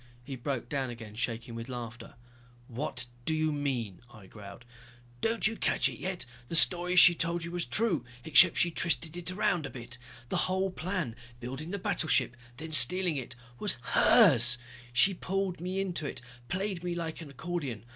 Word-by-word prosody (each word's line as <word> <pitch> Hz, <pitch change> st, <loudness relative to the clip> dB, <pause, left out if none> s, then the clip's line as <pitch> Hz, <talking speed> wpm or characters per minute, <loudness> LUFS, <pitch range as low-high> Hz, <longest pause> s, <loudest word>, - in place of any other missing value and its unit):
He 135 Hz, +2 st, -7 dB
broke 130 Hz, -1 st, -4 dB
down 135 Hz, -1 st, -2 dB
again, 115 Hz, -3 st, -9 dB
shaking 115 Hz, +1 st, -4 dB
with 115 Hz, +2 st, -7 dB
laughter. 120 Hz, -1 st, -8 dB, 0.5 s
"What 125 Hz, 0 st, -4 dB, 0.2 s
do 160 Hz, -, 0 dB
you 155 Hz, 0 st, 0 dB
mean," 125 Hz, -10 st, -3 dB
I 110 Hz, -3 st, -14 dB
growled. 100 Hz, +3 st, -12 dB, 0.6 s
"Don't 225 Hz, 0 st, 0 dB
you 215 Hz, +1 st, +1 dB
catch -, -, +1 dB
yet? 185 Hz, -7 st, -4 dB, 0.2 s
The 165 Hz, -, -4 dB
story 180 Hz, +1 st, +5 dB
she 180 Hz, -1 st, +9 dB
told 170 Hz, 0 st, -1 dB
you 170 Hz, -, -6 dB
was 175 Hz, -1 st, -2 dB
true 195 Hz, -, 0 dB, 0.2 s
except 160 Hz, -, +6 dB
she 175 Hz, -, +2 dB
twisted 165 Hz, -1 st, -1 dB
it 175 Hz, 0 st, -5 dB
around 180 Hz, -4 st, 0 dB
a -, -, -9 dB
bit. 120 Hz, -1 st, -9 dB, 0.3 s
The -, -, -1 dB
whole 190 Hz, +1 st, 0 dB
plan, 175 Hz, -, -4 dB, 0.2 s
building 135 Hz, +6 st, -6 dB
the 200 Hz, -, -3 dB
battleship, 145 Hz, -, 0 dB, 0.2 s
then 160 Hz, +1 st, -7 dB
stealing 180 Hz, +1 st, +6 dB
it, 130 Hz, -4 st, -6 dB, 0.2 s
was 205 Hz, -, -1 dB, 0.2 s
hers. 130 Hz, -, +6 dB, 0.3 s
She 185 Hz, +11 st, +4 dB
pulled 190 Hz, -1 st, -3 dB
me 185 Hz, +2 st, -3 dB
into 175 Hz, -6 st, -2 dB
it, 130 Hz, -, -7 dB, 0.3 s
played 190 Hz, -1 st, -3 dB
me 175 Hz, -1 st, -3 dB
like 165 Hz, -1 st, -5 dB
an 155 Hz, -, -9 dB
accordion. 140 Hz, -, -5 dB
160 Hz, 175 wpm, -29 LUFS, 125-180 Hz, 0.6 s, she